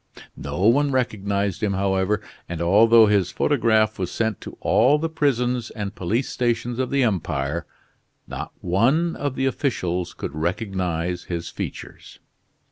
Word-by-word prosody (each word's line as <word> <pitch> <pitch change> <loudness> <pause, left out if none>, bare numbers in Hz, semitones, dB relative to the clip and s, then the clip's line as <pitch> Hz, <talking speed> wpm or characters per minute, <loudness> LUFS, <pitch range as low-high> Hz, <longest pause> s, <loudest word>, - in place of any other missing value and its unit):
No 70 +5 -5
one 140 +6 +4
recognized 100 -6 -1
him, 105 -2 0
however, 95 +1 0 0.3
and 85 -2 -4
although 110 +6 +6
his 100 -4 +2
photograph 110 -6 +2
was 90 -2 -2
sent 110 -3 -1
to - - -9
all 135 +6 +4
the 160 +2 -1
prisons 125 -6 0
and 105 -3 -5
police 110 +9 -1
stations 120 0 -1
of 130 - 0
the 140 -1 +2
empire, 80 - -1 0.6
not - - -6
one 130 - +2
of 145 -2 -3
the 135 - 0
officials 90 - -1
could - - -5
recognize 90 0 -2
his 85 -1 -4
features. - - -8
105 Hz, 140 wpm, -23 LUFS, 90-125 Hz, 0.6 s, although